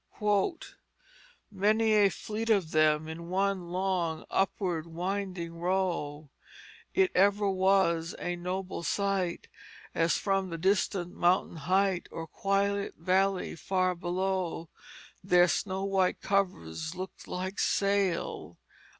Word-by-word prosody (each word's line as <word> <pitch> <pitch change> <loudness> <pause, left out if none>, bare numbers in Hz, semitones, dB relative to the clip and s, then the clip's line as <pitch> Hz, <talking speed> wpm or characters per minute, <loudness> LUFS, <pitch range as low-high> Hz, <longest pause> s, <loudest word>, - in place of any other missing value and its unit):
" - - -30
Many 215 +3 +2
a 205 -2 +5
fleet 220 +4 -4
of 195 -7 +2
them 155 0 +3
In 170 +2 -7
one 190 -1 0
long 180 -3 -1
upward 180 -4 0
winding 175 -1 -4
row. 170 -5 -1 0.6
It 385 -1 +4
ever 200 +2 +3
was 190 -3 +2
a 175 0 -3
noble 180 +1 -4
sight 195 -1 -1 0.5
As 165 0 +2
from 195 -2 0
the 165 - -4
distant 185 0 0
mountain 175 -1 +2
height 185 +3 +1
Or 165 - -6
quiet 200 +3 -1
valley 190 +3 +1
far 185 +2 0
below, 180 -1 -2 0.5
Their 180 -2 +5
snow 190 +1 -1
white 195 -2 +1
covers 170 - -1
looked 185 +1 -8
like 185 +2 -4
sail." 200 -3 0
185 Hz, 115 wpm, -29 LUFS, 170-195 Hz, 0.6 s, a